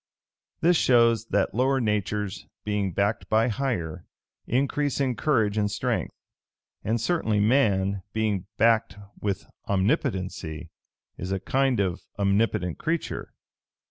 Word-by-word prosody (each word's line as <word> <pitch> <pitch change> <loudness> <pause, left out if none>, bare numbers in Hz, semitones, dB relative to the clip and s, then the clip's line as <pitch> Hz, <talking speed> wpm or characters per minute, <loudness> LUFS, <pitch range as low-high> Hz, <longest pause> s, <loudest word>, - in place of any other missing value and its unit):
This 175 +1 +5
shows, 115 -3 +4
that - - +1
lower 130 +3 +2
natures, 105 -3 -2 0.2
being 105 -2 -1
backed 100 +4 -1
by 110 +2 +3
higher, 100 - -2 0.4
increase 140 +3 0
in 130 -3 +1
courage 110 -5 +1
and 105 -1 +1
strength; - - -1 0.7
and 115 +3 0
certainly 115 -5 +1
man, 100 -4 +2
being 105 -4 -1
backed 110 -5 +3 0.2
with 100 -3 -2 0.2
Omnipotency, 95 - -1 0.5
is 90 +2 -4
a 95 - 0
kind 130 +4 +1
of 95 -3 0 0.2
omnipotent 100 -3 +1
creature. 165 +1 -2
105 Hz, 115 wpm, -26 LUFS, 95-125 Hz, 0.7 s, This